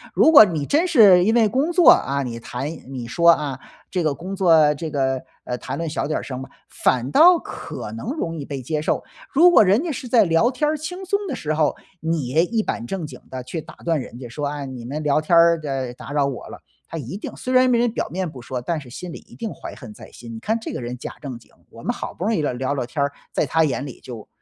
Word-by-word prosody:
如 320 Hz, -, +6 dB
果 285 Hz, -8 st, +11 dB
你 160 Hz, -7 st, -3 dB
真 320 Hz, -, +2 dB
是 205 Hz, -, +7 dB
因 220 Hz, -, +3 dB
为 230 Hz, -2 st, +5 dB
工 275 Hz, +9 st, 0 dB
作 345 Hz, -1 st, +6 dB
啊， 140 Hz, 0 st, +1 dB
你 120 Hz, -2 st, -5 dB
谈 125 Hz, +4 st, -5 dB, 0.2 s
你 125 Hz, -3 st, -6 dB
说 170 Hz, +8 st, +3 dB
啊， 145 Hz, -5 st, -1 dB, 0.3 s
这 185 Hz, -, 0 dB
个 155 Hz, -2 st, +1 dB
工 185 Hz, +5 st, -6 dB
作 165 Hz, -6 st, +5 dB
这 160 Hz, +3 st, -5 dB
个， 135 Hz, -2 st, 0 dB, 0.2 s
呃， 125 Hz, -, -3 dB
谈 -, -, -5 dB
论 165 Hz, -1 st, -3 dB
小 150 Hz, -, -2 dB
点 155 Hz, -, -1 dB
儿 -, -, -8 dB
声 130 Hz, -1 st, -6 dB
吧， 135 Hz, -, -9 dB, 0.2 s
反 125 Hz, 0 st, 0 dB
倒 345 Hz, -, +7 dB
可 -, -, -7 dB
能 230 Hz, +1 st, -5 dB
容 170 Hz, -, -3 dB
易 150 Hz, -, -5 dB
被 140 Hz, -2 st, -5 dB
接 150 Hz, +4 st, -2 dB
受。 155 Hz, -, 0 dB, 0.3 s
如 335 Hz, +6 st, +7 dB
果 220 Hz, -, +7 dB
人 200 Hz, +5 st, +3 dB
家 350 Hz, -, -3 dB
是 260 Hz, -2 st, -6 dB
在 230 Hz, -3 st, +5 dB
聊 170 Hz, +8 st, +3 dB
天 300 Hz, +3 st, 0 dB
儿 310 Hz, -, -1 dB
轻 360 Hz, +5 st, -6 dB
松 400 Hz, +2 st, +1 dB
的 275 Hz, -, -2 dB
时 155 Hz, 0 st, -2 dB
候， 155 Hz, -2 st, +2 dB, 0.3 s
你 160 Hz, -4 st, -1 dB
也 155 Hz, +7 st, +3 dB
一 225 Hz, +4 st, 0 dB
板 115 Hz, -, -3 dB
正 180 Hz, -1 st, -4 dB
经 -, -, -10 dB
地 130 Hz, -, -5 dB
去 160 Hz, +6 st, -5 dB
打 -, -, -13 dB
断 165 Hz, -4 st, +1 dB
人 120 Hz, -1 st, -10 dB
家 125 Hz, -, -7 dB
说， 145 Hz, +6 st, -4 dB
哎， 145 Hz, -1 st, -4 dB
你 130 Hz, -3 st, -8 dB
们 145 Hz, +5 st, -4 dB
聊 150 Hz, +1 st, +2 dB
天 170 Hz, +2 st, +3 dB
儿 170 Hz, 0 st, +5 dB
的 135 Hz, -4 st, -3 dB
打 130 Hz, -, -10 dB
扰 145 Hz, -1 st, +2 dB
我 135 Hz, -3 st, -4 dB
了， -, -, -10 dB, 0.3 s
他 165 Hz, -, -6 dB
一 145 Hz, +3 st, -6 dB
定 -, -, -7 dB
虽 255 Hz, -, -3 dB
然 255 Hz, 0 st, +5 dB
没 245 Hz, -, +3 dB
人 240 Hz, 0 st, +2 dB
表 -, -, -2 dB
面 185 Hz, 0 st, -3 dB
不 135 Hz, -5 st, -11 dB
说， 125 Hz, +1 st, -5 dB
但 165 Hz, +6 st, -2 dB
是 130 Hz, -, -13 dB
心 175 Hz, +7 st, -8 dB
里 -, -, -8 dB
一 -, -, -15 dB
定 225 Hz, -3 st, -4 dB
怀 -, -, -9 dB
恨 120 Hz, -6 st, -11 dB
在 -, -, -13 dB
心， 115 Hz, -1 st, -10 dB
你 -, -, -7 dB
看 220 Hz, -, -1 dB
这 225 Hz, -, -6 dB
个 -, -, -4 dB
人 120 Hz, +1 st, -5 dB
假 -, -, -7 dB
正 130 Hz, -4 st, -6 dB
经， -, -, -23 dB, 0.2 s
我 -, -, -13 dB
们 -, -, -1 dB
好 -, -, -6 dB
不 180 Hz, -, -5 dB
容 220 Hz, +1 st, +1 dB
易 160 Hz, -, 0 dB
聊 145 Hz, -, 0 dB
聊 130 Hz, +3 st, -2 dB
聊 130 Hz, -3 st, -2 dB
天 140 Hz, +4 st, -4 dB
儿， 140 Hz, -, -1 dB, 0.2 s
在 -, -, +1 dB
他 160 Hz, 0 st, +2 dB
眼 135 Hz, -1 st, -2 dB
里 135 Hz, -, -10 dB
就 115 Hz, -4 st, -9 dB
155 Hz, 295 characters per minute, -22 LUFS, 130-215 Hz, 0.3 s, 果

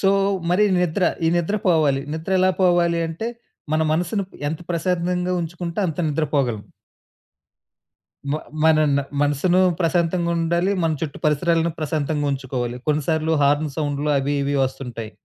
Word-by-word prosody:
So 195 Hz, -, +3 dB, 0.4 s
మరి 190 Hz, +4 st, +4 dB, 0.2 s
నిద్ర. 180 Hz, +2 st, +1 dB, 0.2 s
ఈ -, -, +4 dB
నిద్ర 185 Hz, +5 st, -1 dB
పోవాలి. 155 Hz, -6 st, +3 dB
నిద్ర 160 Hz, +4 st, -5 dB
ఎలా 185 Hz, 0 st, +4 dB
పోవాలి 175 Hz, -2 st, +3 dB
అంటే 175 Hz, +8 st, -4 dB, 0.5 s
మన 160 Hz, -, +2 dB
మనసుని 180 Hz, +5 st, 0 dB, 0.2 s
ఎంత 160 Hz, +2 st, -4 dB
ప్రశాంతంగా 180 Hz, +1 st, 0 dB
ఉంచుకుంటే 170 Hz, +1 st, -5 dB
అంత 160 Hz, -, -6 dB
నిద్ర 155 Hz, +1 st, 0 dB
పోగలం. 120 Hz, -7 st, 0 dB, 1.7 s
మ -, -, +1 dB, 0.3 s
మనన 155 Hz, -3 st, +4 dB, 0.2 s
మనసును 145 Hz, +6 st, +2 dB, 0.2 s
ప్రశాంతంగా 170 Hz, 0 st, +1 dB
ఉండాలి. 170 Hz, +3 st, +1 dB
మన 160 Hz, -1 st, +2 dB
చుట్టూ 155 Hz, -3 st, -4 dB
పరిసరాలను 165 Hz, +2 st, +2 dB
ప్రశాంతంగా 150 Hz, -1 st, -1 dB
ఉంచుకోవాలి. 125 Hz, -2 st, -3 dB
కొన్నిసార్లు 155 Hz, +2 st, 0 dB
హార్న్ 145 Hz, +1 st, +2 dB
సౌండ్‌లు 145 Hz, -1 st, -1 dB
అవి 140 Hz, +2 st, -1 dB
ఇవి 140 Hz, +1 st, -1 dB
వస్తుంటాయి. 125 Hz, -4 st, -6 dB
160 Hz, 135 wpm, -22 LUFS, 145-175 Hz, 1.7 s, మరి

